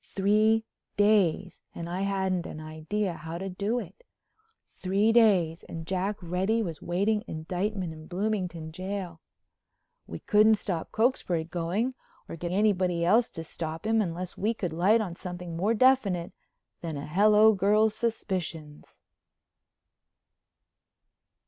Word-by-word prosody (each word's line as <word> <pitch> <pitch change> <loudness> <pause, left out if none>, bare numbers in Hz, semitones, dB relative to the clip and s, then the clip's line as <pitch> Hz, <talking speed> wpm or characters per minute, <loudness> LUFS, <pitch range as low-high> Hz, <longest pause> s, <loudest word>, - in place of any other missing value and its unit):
Three 215 +3 +3 0.3
days 200 -3 +2
and 170 - -5
I 180 +2 -3
hadn't 190 -3 -1
an 155 - -8
idea 160 +6 -3
how 165 +1 -7
to 195 +2 -5
do 200 +6 -2
it. 365 - -7 0.7
Three 200 +4 +1
days 190 -8 +3
and 165 -1 -7
Jack 190 +3 -2
Reddy 190 +6 0
was 165 -6 -6
waiting 205 +5 0
indictment 180 +3 -3
in 155 0 -12
Bloomington 180 -4 -3
jail. 185 -1 -5 0.9
We - - -6
couldn't 215 +1 +4
stop 180 -5 -4
Cokesbury 220 -8 +1
going 175 +9 -2 0.3
or - - -7
get 175 +1 -5
anybody 185 -4 +1
else 225 +7 +4
to 165 - -7
stop 160 +2 -6
him 225 0 +3
unless 180 -1 -4
we 220 +3 -1
could 180 -6 -3
light 200 +7 +3
on 180 -5 -4
something 175 -2 -7
more 205 +7 +1
definite 210 -8 +2 0.5
than 160 -3 -4
a 140 - -5
hello 210 +6 +5
girl's 210 +2 +3
suspicions. 180 -10 -4
190 Hz, 130 wpm, -28 LUFS, 170-215 Hz, 0.9 s, hello